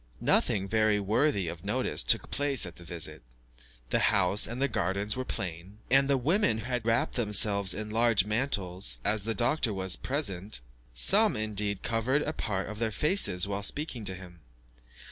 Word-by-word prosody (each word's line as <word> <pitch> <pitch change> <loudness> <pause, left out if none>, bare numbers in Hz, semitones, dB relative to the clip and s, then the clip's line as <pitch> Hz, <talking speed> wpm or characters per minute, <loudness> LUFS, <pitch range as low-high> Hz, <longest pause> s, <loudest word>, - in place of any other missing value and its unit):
Nothing 95 -1 +1
very 110 0 +2
worthy 100 - 0
of 85 +1 -7
notice - - 0
took - - +2
place 140 -5 +1
at 85 - -10
this 85 - -13
visit. 85 -2 -4 0.7
The - - +1
house 100 -1 +2
and 120 +2 -5
garden 100 +3 -2
were 130 - -3
plain, 90 -2 -5
and 135 +1 +5
the 140 -1 +2
women 140 - +1
had 120 0 -4
wrapped 115 +1 +1
themselves 105 -3 +2
in 105 +1 -6
large 115 -3 +2
mantles, 100 - 0
as 105 -1 +1
the 115 0 -1
doctor 125 0 0
was 95 -2 +1
present, 105 - -3 0.3
some, - - +3
indeed, 105 -2 -2
covered 125 +6 0
a 155 - -3
part 100 -9 -3
of 105 +1 -8
their 115 -1 0
faces 110 - +2
while 100 0 -3
speaking 130 +1 -2
with 95 -1 -4
him. 90 -2 -13
105 Hz, 165 wpm, -28 LUFS, 95-120 Hz, 0.7 s, and